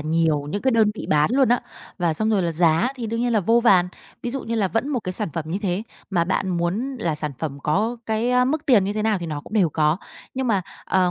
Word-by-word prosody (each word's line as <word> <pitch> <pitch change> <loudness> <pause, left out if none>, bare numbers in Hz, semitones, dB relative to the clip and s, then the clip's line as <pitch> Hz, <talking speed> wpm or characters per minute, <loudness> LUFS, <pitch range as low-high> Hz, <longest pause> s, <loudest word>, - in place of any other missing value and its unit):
nhiều 155 -1 +1
những 205 - -3
cái 265 - +3
đơn 220 -3 +4
vị - - -7
bán 150 +3 +3
luôn 265 -1 +4
á. 245 - +3 0.4
Và 170 -2 +1
xong 215 +7 0
rồi 200 -4 +2
là 170 -1 0
giá 165 +6 +3
thì 235 -2 -4
đương 230 +1 -2
nhiên 245 0 +1
là 215 - +3
vô 230 +5 +3
vàn. 185 -6 +4 0.3
Ví 240 - -2
dụ 270 +1 -3
như 230 - -3
là 205 -4 +1
vẫn 225 +7 -1
một 265 -5 -1
cái 185 -3 -4
sản 210 0 -2
phẩm 165 0 -3
như 180 - -2
thế, 185 +1 -1 0.3
mà 170 -3 +2
bạn 190 +1 -1
muốn 185 +10 -1
là 165 -7 -1
sản 150 -1 -4
phẩm 145 -3 -4
có 215 +10 0
cái, 220 +2 0
a, 250 0 +4
mức 300 +4 -1
tiền 225 -8 +5
như 200 - -1
thế 215 0 -2
nào 215 -3 +1
thì 170 - -5
nó 150 -2 -4
cũng 215 - -14
đều 195 -7 +3
có. 150 +2 +2 0.4
Nhưng 260 0 -1
mà, 200 -5 +2 0.2
ờ, 180 -1 +2
200 Hz, 280 wpm, -23 LUFS, 170-230 Hz, 0.4 s, tiền